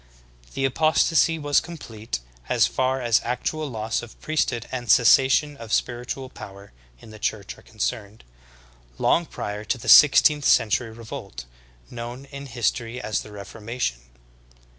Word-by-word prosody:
The 135 - 0
apostasy 160 +3 +2
was 145 -2 +2
complete, 115 - -7 0.3
as - - +4
far 130 +1 0
as 120 -1 +3
actual 150 +5 -3
loss 110 -2 -2
of 120 - -13
priesthood 130 -7 -1
and 120 -3 -5
cessation 135 +6 +5
of 115 -3 -10
spiritual 125 +3 -2
power 100 -5 -12 0.3
in 110 - -14
the 110 - -12
Church 105 -1 -3
are - - -17
concerned, 110 -1 -5 0.7
long 170 -1 +2
prior 105 +1 -5
to 130 - -1
the 115 - -10
six 150 - +9
teenth 150 -1 +2
century 115 +2 +3
revolt, 110 - -9 0.5
knovvU 120 +3 -7
in 140 0 -8
history 120 0 -2
as 110 - -2
the 105 - -12
Reformation. 105 - -5
120 Hz, 140 wpm, -24 LUFS, 110-135 Hz, 0.7 s, six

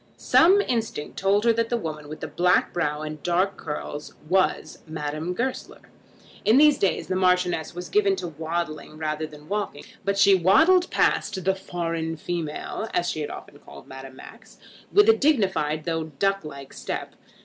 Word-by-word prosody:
Some 380 +5 +5
instinct 225 - -3
told 200 +2 +2
her 230 - +5
that 230 0 0
that 240 - +1
woman 155 -7 -6
with 155 - -8
the 160 - -4
black 180 +4 +2
brow 150 -3 -1
and 155 0 -6
the - - -27
dark 185 +3 +1
curls 150 -2 -6
was 185 +2 +1
Madame 155 +2 -4
Goesler. 255 +4 -4 0.6
In 220 +4 +5
these 300 0 +6
days 195 - +1
the 185 - -1
Marchioness 180 -3 +1
was 180 0 -6
given 200 -2 +2
to 185 -2 -5
waddling 160 -1 -4
rather 155 0 -2
than 150 -1 -13
to - - -17
walking, 200 -5 -3 0.2
but 200 +1 0
she 200 0 +6
waddled 320 - +5
past 190 -3 +1
the 190 - +3
foreign 165 -3 -4
female, 170 +6 -4
as 175 0 +1
she 155 - -4
had 150 - -3
often - - -10
called 70 0 -14
Madame 135 0 -10
Max, - - -14 0.3
with 415 +1 +5
a 450 - +8
dignified 190 - +1
though 165 -1 -2
duck 195 +6 -1
like 140 -3 -9
step. - - -5
175 Hz, 180 wpm, -25 LUFS, 155-200 Hz, 0.6 s, a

